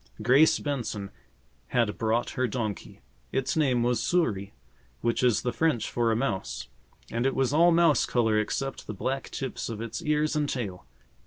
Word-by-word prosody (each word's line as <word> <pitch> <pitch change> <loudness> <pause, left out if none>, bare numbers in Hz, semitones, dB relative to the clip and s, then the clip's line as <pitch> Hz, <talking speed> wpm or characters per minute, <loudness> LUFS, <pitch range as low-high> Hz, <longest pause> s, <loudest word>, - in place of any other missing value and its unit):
Grace 130 +8 +5
Benson 120 -8 -3 0.6
had 115 -4 0
brought 115 +2 0
her 130 0 0
donkey. 110 - -4 0.3
Its 135 0 -1
name 130 -6 +2
was 120 0 +1
Souris, 105 - 0 0.5
which 115 0 0
is 125 -3 +3
the 125 - -1
French 155 -9 0
for 120 -1 +1
a - - +2
mouse, 95 - -3 0.4
and 120 +3 0
it 135 - -1
was 135 0 +1
all 170 +3 +6
mouse 165 -3 +4
color 110 -3 +2
except 135 +5 -3
the 110 - -5
black 135 +6 -3
tips 135 -3 -4
of 110 -2 -5
its 115 0 -5
ears 150 0 +1
and 150 -1 0
tail. 100 -8 -4
125 Hz, 170 wpm, -27 LUFS, 110-140 Hz, 0.6 s, all